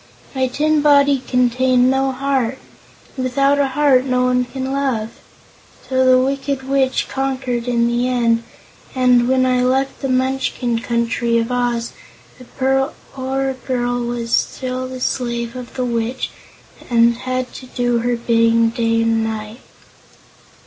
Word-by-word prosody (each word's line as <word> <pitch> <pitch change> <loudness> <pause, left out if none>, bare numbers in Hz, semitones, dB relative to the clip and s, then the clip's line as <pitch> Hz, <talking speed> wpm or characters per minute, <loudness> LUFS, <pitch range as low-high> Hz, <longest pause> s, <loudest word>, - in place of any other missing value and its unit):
My 260 -1 0
tin 300 +4 +1
body 285 -2 +4
contained 250 0 +2
no 270 0 +1
heart, 265 -2 -1 0.6
and 260 - -3
without 275 +3 +2
a 280 - +3
heart 270 -2 +3
no 255 -1 +1
one 250 0 +2
can 265 +1 -5
love. 260 -6 -1 0.8
So 260 0 +2
the 255 0 +5
Wicked 270 +1 -1
Witch 270 -1 +1
conquered 260 -3 -2
in 235 -1 +2
the 240 +1 0
end, 235 -2 +1 0.5
and 250 -2 +4
when 260 0 +3
I 255 -1 +2
left 265 +2 0
the 270 - -2
Munchkin 255 -2 0
Country 235 0 0
of 230 +1 -1
Oz, 240 -1 -1 0.5
the 250 - -12
poor 270 0 -2
girl 245 -1 -1
was 235 -1 -4
still 255 0 -1
the 255 0 -8
slave 235 -2 -2
of 250 -1 -9
the 255 - -1
Witch 235 +1 -2 0.6
and 235 -1 +4
had 255 0 -3
to 255 - -10
do 245 -1 0
her 240 +1 0
bidding 230 -1 +2
day 230 -1 0
and 225 0 +1
night." 220 +1 -5
255 Hz, 145 wpm, -19 LUFS, 235-265 Hz, 0.8 s, the